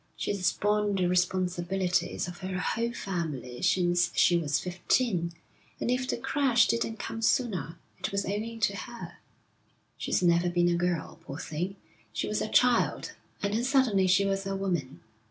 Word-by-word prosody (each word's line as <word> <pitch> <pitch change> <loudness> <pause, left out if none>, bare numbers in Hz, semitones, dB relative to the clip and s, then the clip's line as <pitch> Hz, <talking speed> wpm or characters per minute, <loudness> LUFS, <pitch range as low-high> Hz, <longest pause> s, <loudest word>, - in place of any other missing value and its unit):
She's 190 -3 0
borne 210 0 +1
the 185 -2 +1
responsibilities 180 0 0
of 175 0 -8
her 185 -1 -4
whole 230 +7 -1
family 155 - -4
since 175 -1 +3
she 175 - +5
was 150 -4 +1
fifteen, 180 0 0 0.5
and 240 - 0
if 255 +1 0
the - - 0
crash 265 -1 +3
didn't 230 -1 -1
come 225 - -5
sooner, 215 - 0 0.2
it - - -3
was 200 0 -1
owing 220 +3 -3
to 200 -1 +2
her. 235 +4 -8 0.8
She's - - 0
never 170 0 +4
been 175 0 +2
a 175 - +2
girl, 175 -2 -2
poor 135 - -7
thing; 175 +5 -4 0.4
she - - -2
was - - -1
a - - -2
child, - - +3 0.3
and 200 0 0
then 230 +3 +1
suddenly 250 -8 +3
she 190 +2 +4
was 195 0 -1
a 195 - -2
woman.' 175 -9 -2
190 Hz, 165 wpm, -29 LUFS, 175-215 Hz, 0.8 s, she